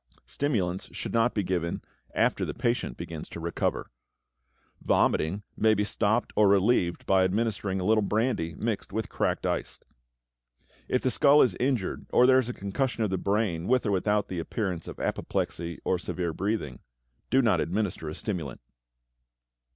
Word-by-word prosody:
Stimulants 95 Hz, -11 st, -1 dB
should -, -, -4 dB
not 115 Hz, +1 st, +2 dB
be 105 Hz, -, +1 dB
given 85 Hz, -2 st, -1 dB, 0.4 s
after -, -, +2 dB
the -, -, -3 dB
patient 120 Hz, -, -1 dB
begins 80 Hz, -2 st, -7 dB
to -, -, -7 dB
recover. 85 Hz, +1 st, -2 dB, 0.9 s
Vomiting 95 Hz, +7 st, +1 dB
may 110 Hz, 0 st, +3 dB
be 105 Hz, -, +1 dB
stopped 110 Hz, +2 st, 0 dB
or 105 Hz, -1 st, +5 dB
relieved 95 Hz, -3 st, +2 dB
by 95 Hz, -1 st, +4 dB
administering 100 Hz, 0 st, 0 dB
a -, -, -2 dB
little 110 Hz, +3 st, +3 dB
brandy 105 Hz, -6 st, 0 dB
mixed 110 Hz, 0 st, -3 dB
with 110 Hz, -1 st, -3 dB
cracked -, -, -1 dB
ice. -, -, -2 dB, 1.1 s
If 125 Hz, -, 0 dB
the 130 Hz, -, +2 dB
skull 145 Hz, +3 st, +6 dB
is 125 Hz, -, +2 dB
injured 125 Hz, -6 st, -1 dB
or 125 Hz, -, +5 dB
there 130 Hz, 0 st, +6 dB
is 125 Hz, -2 st, -2 dB
concussion 115 Hz, +3 st, -2 dB
of 105 Hz, -, -1 dB
the 95 Hz, -, 0 dB
brain, 100 Hz, -4 st, 0 dB
with 125 Hz, 0 st, +2 dB
or 105 Hz, -, +1 dB
without 105 Hz, +2 st, +1 dB
the 90 Hz, -, -4 dB
appearance 90 Hz, -1 st, -3 dB
of -, -, -8 dB
apoplexy 85 Hz, 0 st, -2 dB
or 90 Hz, -, +1 dB
severe 85 Hz, -2 st, -3 dB
breathing, 95 Hz, -, -2 dB, 0.5 s
do 135 Hz, -, +4 dB
not 105 Hz, -8 st, +3 dB
administer 90 Hz, -3 st, -2 dB
a 75 Hz, -, -6 dB
stimulant. 85 Hz, -, -4 dB
100 Hz, 160 wpm, -28 LUFS, 90-115 Hz, 1.1 s, skull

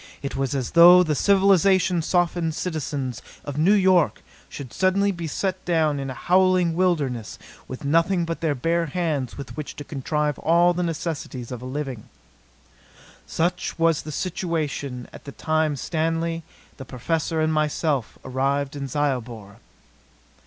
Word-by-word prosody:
It 140 Hz, -, -4 dB
was 135 Hz, 0 st, -1 dB
as 130 Hz, -3 st, -2 dB
though 175 Hz, +2 st, +8 dB
the 155 Hz, -3 st, 0 dB
civilization 190 Hz, -1 st, +3 dB
softened 170 Hz, -1 st, 0 dB
citizens 145 Hz, -, -3 dB, 0.2 s
of 145 Hz, 0 st, -4 dB
New 190 Hz, +7 st, +5 dB
York 185 Hz, -4 st, +3 dB, 0.3 s
should 135 Hz, -5 st, -9 dB
suddenly 200 Hz, +2 st, +2 dB
be 170 Hz, -3 st, -5 dB
set 185 Hz, +4 st, -2 dB
down 155 Hz, -4 st, +1 dB
in 135 Hz, -1 st, -4 dB
a 130 Hz, -, -6 dB
howling 180 Hz, +1 st, +3 dB
wilderness 150 Hz, -, 0 dB, 0.3 s
with 130 Hz, +2 st, -7 dB
nothing 165 Hz, +4 st, +2 dB
but 165 Hz, 0 st, -4 dB
their 155 Hz, -3 st, 0 dB
bare 165 Hz, +5 st, 0 dB
hands 150 Hz, -5 st, -2 dB
with 140 Hz, -, -8 dB
which 150 Hz, -2 st, -6 dB
to 145 Hz, -, -7 dB
contrive 150 Hz, +1 st, -2 dB
all 170 Hz, +2 st, +4 dB
the 175 Hz, -, -2 dB
necessities 155 Hz, -7 st, -4 dB
of 125 Hz, -2 st, -6 dB
a -, -, -8 dB
living. 130 Hz, -4 st, -5 dB, 1.2 s
Such 175 Hz, +2 st, -1 dB
was 165 Hz, -2 st, +2 dB
the 155 Hz, -, -8 dB
situation 150 Hz, -7 st, -3 dB
at -, -, -12 dB
the 140 Hz, -, -7 dB
time 155 Hz, 0 st, 0 dB
Stanley, 165 Hz, +3 st, -2 dB, 0.4 s
the 135 Hz, -, -7 dB
Professor 160 Hz, +6 st, -2 dB
and 155 Hz, 0 st, +1 dB
myself 150 Hz, -4 st, -1 dB
arrived 135 Hz, +2 st, -1 dB
in 140 Hz, -1 st, -4 dB
Zyobor. 120 Hz, -7 st, -3 dB
155 Hz, 150 wpm, -23 LUFS, 140-175 Hz, 1.2 s, though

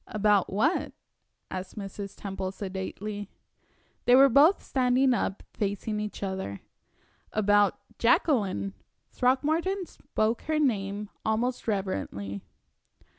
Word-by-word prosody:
"About 210 Hz, -2 st, +2 dB
what?" 245 Hz, -, +1 dB, 0.6 s
asked 185 Hz, +3 st, -6 dB
Mrs. 200 Hz, -1 st, -7 dB
Temple, 190 Hz, -1 st, -4 dB
sedately. 200 Hz, +1 st, -5 dB, 0.8 s
They 245 Hz, -, +7 dB
were 275 Hz, +1 st, +8 dB
both 295 Hz, +9 st, +5 dB
standing 255 Hz, 0 st, +3 dB
up, 200 Hz, -4 st, -2 dB
facing 210 Hz, +1 st, -2 dB
each 210 Hz, -1 st, -5 dB
other. 190 Hz, -, -4 dB, 0.7 s
"About 205 Hz, -1 st, +3 dB, 0.2 s
Jacqueline." 200 Hz, -, +2 dB, 0.4 s
Throckmorton 315 Hz, +9 st, +1 dB
spoke 230 Hz, -8 st, -2 dB
her 310 Hz, 0 st, +1 dB
name 210 Hz, -7 st, 0 dB
almost 235 Hz, +4 st, -1 dB
reverently. 100 Hz, -, -2 dB
210 Hz, 100 wpm, -28 LUFS, 195-255 Hz, 0.8 s, were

